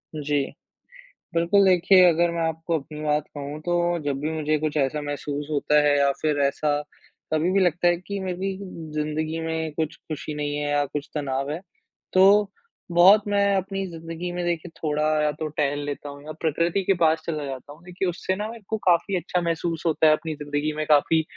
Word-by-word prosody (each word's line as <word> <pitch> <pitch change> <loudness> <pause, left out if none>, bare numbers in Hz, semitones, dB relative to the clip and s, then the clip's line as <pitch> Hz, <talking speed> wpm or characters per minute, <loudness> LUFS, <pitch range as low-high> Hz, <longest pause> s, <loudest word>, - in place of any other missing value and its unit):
जी। 145 -1 0 0.9
बिल्कुल, 170 +4 +4
देखिए 185 0 +6
अगर 170 +1 +2
मैं 170 0 -2
आपको 160 +1 -2
अपनी 150 +2 -10
बात 150 0 +1
कहूँ, 145 +1 -5
तो 175 +1 0
जब 140 -2 -2
भी 155 +3 -2
मुझे 155 -1 0
कुछ 155 0 -2
ऐसा 145 +1 0
महसूस 145 0 -4
होता 150 0 +3
है, 145 -1 +3
या 140 0 +4
फिर 150 -2 +1
ऐसा 145 +1 +1 0.5
कभी 160 +3 +2
भी 195 - +4
लगता 175 -1 +2
है 175 0 +3
कि 200 +3 -6
मेरी 190 +1 -3 0.4
ज़िंदगी 155 +1 -2
में 160 -1 -3
कुछ 155 0 -2
खुशी 155 0 -6
नहीं 145 -1 -2
है 145 0 -2
या 145 0 +2
कुछ 145 +1 -5
तनाव 140 -1 -2
है, 155 - -3 0.5
तो 195 +2 +5 0.4
बहुत 190 +5 +7
मैं 200 -1 +2
अपनी 195 +1 -2
ज़िंदगी 165 +1 -6
में 175 0 -3
देखिए 175 0 -2
थोड़ा 150 -1 0 0.2
या 150 0 +2
तो 155 +1 -4
टहल 145 -1 -1
लेता 145 0 -5
हूँ 145 0 -10
या 155 - -6
प्रकृति 170 +3 +1
के 195 - +3
पास 160 0 +4
चला 155 -3 -3
जाता 135 +1 -7
हूँ। 160 +3 -19
देखिए, 180 +1 -3
उससे 180 +2 -2
ना 210 +2 -3
मेरे 230 -1 -10
को 220 - 0
काफ़ी 175 +2 +3
अच्छा 180 +1 -1
महसूस 165 -1 -2
होता 160 -1 +3
है, 155 - +7
अपनी 155 +1 -3
ज़िंदगी 145 +1 -2
में 155 - -1
काफ़ी 155 +2 +4
160 Hz, 200 wpm, -24 LUFS, 150-175 Hz, 0.9 s, बहुत